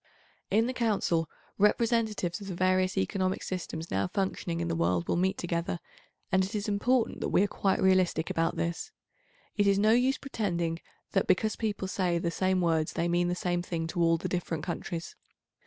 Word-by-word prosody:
In 220 +3 +3
the 255 - -2
Council, 195 -9 +1 0.3
representatives 215 -3 +2
of 200 - -7
the 185 - -4
various 185 +1 +2
economic 185 - 0
systems 165 -3 -5
now 95 0 +1
functioning 175 - -2
in 170 - -1
the 165 - -1
world 90 - +1
will - - +1
meet 185 +2 +1
together, 170 0 -2 0.5
and 190 0 +4
it 195 +3 -4
is 210 0 -2
important 230 +4 +1
that - - -1
we - - +4
are - - +2
quite 195 -1 0
realistic 185 -3 +2
about 165 0 0
this. 170 0 -3 0.7
It 205 -1 +3
is 200 0 +4
no 215 +2 +4
use 250 +3 +3
pretending 175 -10 -2 0.3
that, 195 - +1
because 215 +3 +2
people 210 -4 -2
say 180 -2 0
the 170 0 -1
same 185 +1 +1
words 160 -2 +1
they 170 - 0
mean 175 0 +2
the 175 - 0
same 175 -1 -1
thing 170 -2 -3
to 175 0 -2
all 165 0 +4
the - - -4
different 170 -3 -3
countries. 170 -1 -5
185 Hz, 190 wpm, -29 LUFS, 170-200 Hz, 0.7 s, and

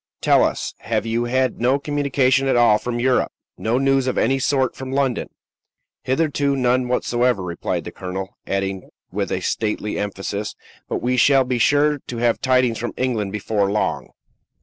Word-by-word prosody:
Tell - - +4
us, - - -1
have - - -2
you 115 +1 0
had 130 0 0
no 130 +3 +3
communication 140 -2 +1
at 135 - +2
all 115 -3 +5
from 120 -1 -3
Europe? 130 +1 +2 0.2
no 115 +2 0
news 135 -1 +2
of 130 - -1
any 135 0 +2
sort 130 -1 +1
from 130 0 -7
London?" 135 -3 0 0.7
"Hitherto, 140 0 0
none 125 -1 +1
whatever," 125 -3 +1
replied 85 -2 -3
the - - -7
colonel; 95 +1 -6
adding 95 -1 -2 0.2
with - - -2
a - - -1
stately 105 -1 -2
emphasis, 105 +1 -4 0.3
"but - - -3
we 125 +1 +1
shall 135 +1 +5
be 125 -1 -1
sure 145 +3 +3
to 120 - -5
have 120 0 +1
tidings 130 -3 +2
from 120 - -4
England 115 -6 -1
before 105 -1 0
long." 105 - -1
125 Hz, 170 wpm, -21 LUFS, 110-135 Hz, 0.7 s, all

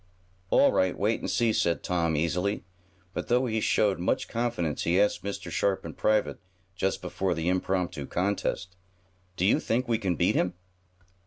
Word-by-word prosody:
"All - - +5
right, 95 0 +1
wait 110 +3 +1
and - - -4
see," 115 -2 +2
said 85 -4 +1
Tom, 85 -3 0
easily. 90 +7 0 0.5
But, - - -4
though 125 +2 +2
he 110 -2 -1
showed 100 -4 +2
much 90 - 0
confidence 115 - -2
he 85 +3 +2
asked 105 0 +2
Mr. 100 -3 -5
Sharp 95 +3 0
in 80 - -6
private, 110 -1 +1 0.4
just 95 +1 -1
before 95 -2 -1
the 80 +1 -2
impromptu 90 -5 -1
contest: 90 -1 -2 0.6
"Do 90 - +1
you 100 - +4
think 125 +3 -1
we 115 -2 +1
can 95 -5 0
beat - - +2
him?" 90 0 0
95 Hz, 170 wpm, -28 LUFS, 85-110 Hz, 0.6 s, All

